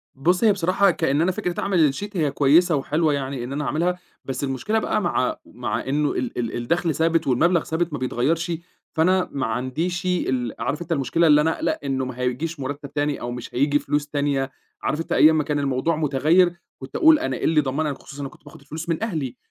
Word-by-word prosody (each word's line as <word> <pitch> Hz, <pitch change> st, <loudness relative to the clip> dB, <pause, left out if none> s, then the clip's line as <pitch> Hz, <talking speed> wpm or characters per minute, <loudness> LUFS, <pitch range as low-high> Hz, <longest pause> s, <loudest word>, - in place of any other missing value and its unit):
بُص، 180 Hz, -, +1 dB
هي 215 Hz, -, +6 dB
بصراحة 190 Hz, +1 st, +3 dB
كإن 145 Hz, -2 st, +1 dB
أنا 185 Hz, +2 st, +2 dB
فكرة 180 Hz, -3 st, -3 dB
أعمل 165 Hz, -8 st, +3 dB
الsheet، 205 Hz, +7 st, -5 dB
هي 150 Hz, -4 st, +1 dB
كويسة 160 Hz, +5 st, +4 dB
وحلوة 150 Hz, +2 st, +1 dB
يعني 135 Hz, -3 st, -3 dB
إن 130 Hz, +3 st, -5 dB
أنا 150 Hz, 0 st, -2 dB
أعملها. 175 Hz, +5 st, 0 dB, 0.3 s
بس 135 Hz, +1 st, -4 dB
المشكلة 135 Hz, -, 0 dB
بقى -, -, 0 dB
مع -, -, 0 dB
مع -, -, -4 dB
إنه 145 Hz, +2 st, +1 dB
ال 250 Hz, -, -3 dB
ال 115 Hz, -2 st, -2 dB
الدخل 160 Hz, +6 st, 0 dB
ثابت 165 Hz, -1 st, +1 dB
والمبلغ 170 Hz, +6 st, +3 dB
ثابت 165 Hz, 0 st, -2 dB
ما 145 Hz, -, -3 dB
بيتغيّرش، 150 Hz, +7 st, 0 dB, 0.4 s
فأنا 185 Hz, +3 st, +2 dB
ما 135 Hz, -3 st, -2 dB
عنديش 130 Hz, +10 st, -2 dB
ال 130 Hz, -10 st, 0 dB
عارف 140 Hz, +8 st, -2 dB
أنت 170 Hz, -, -7 dB
المشكلة 160 Hz, +3 st, +2 dB
اللي 150 Hz, 0 st, +6 dB
أنا 160 Hz, +2 st, +1 dB
أقَلَق -, -, -1 dB
إنه 135 Hz, -1 st, -1 dB
ما 125 Hz, -1 st, -7 dB
هيجيش 140 Hz, +6 st, -2 dB
مُرتَّب 140 Hz, +1 st, -5 dB
تاني 145 Hz, -1 st, -1 dB
أو 120 Hz, -, -4 dB
مش 125 Hz, -, -7 dB
هييجي 145 Hz, +3 st, +3 dB
فلوس 145 Hz, 0 st, -1 dB
تانية. 140 Hz, -2 st, -1 dB, 0.3 s
عارف 155 Hz, +2 st, -1 dB
أنت -, -, -9 dB
أيام 155 Hz, 0 st, +6 dB
ما 155 Hz, -, +2 dB
كان 145 Hz, 0 st, -1 dB
الموضوع 140 Hz, +4 st, 0 dB
مُتغيّر 155 Hz, +4 st, +3 dB, 0.3 s
كنت 130 Hz, -, -9 dB
أقول 315 Hz, -1 st, +6 dB
أنا 320 Hz, -, -2 dB
إيه -, -, -7 dB
اللي 160 Hz, -1 st, +3 dB
يضمنني 145 Hz, +1 st, 0 dB
خصوصًا 140 Hz, +1 st, -10 dB
أنا 140 Hz, -, -4 dB
كنت -, -, -20 dB
باخد -, -, -13 dB
الفلوس 155 Hz, +4 st, -7 dB
من 165 Hz, +5 st, -1 dB
أهلي. 155 Hz, -, -3 dB
150 Hz, 210 wpm, -23 LUFS, 135-170 Hz, 0.4 s, هي